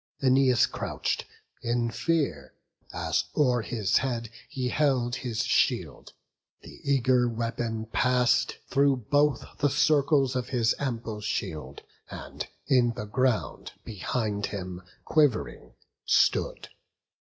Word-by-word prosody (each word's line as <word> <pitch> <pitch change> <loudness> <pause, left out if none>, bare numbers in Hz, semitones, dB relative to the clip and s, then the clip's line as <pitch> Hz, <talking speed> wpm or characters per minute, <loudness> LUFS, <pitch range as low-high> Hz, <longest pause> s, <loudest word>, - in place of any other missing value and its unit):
Æneas 130 -2 +4
crouch'd, - - -3 0.4
in 120 0 0
fear, 135 - -1 0.4
as - - -1
o'er 125 -5 +3
his 110 -3 0
head 120 -4 -2 0.2
He 130 -4 -2
held 130 -4 +1
his 120 -2 -2
shield; - - 0 0.5
the - - -12
eager 130 -3 +2
weapon 115 -1 -3
pass'd 125 +2 +2
Through 140 0 +3 0.2
both 145 0 +3
the 145 - +3
circles 140 -2 +3
of 125 0 -2
his 115 -3 +2
ample 115 -5 -3
shield, 75 -9 -4 0.3
And - - -7 0.2
in 120 -3 +3
the 105 - -5
ground, 125 +2 -1
behind 105 -1 -2
him, 90 -2 -6 0.2
quiv'ring, 130 - +1 0.3
stood. - - +1
125 Hz, 110 wpm, -27 LUFS, 110-135 Hz, 0.5 s, Æneas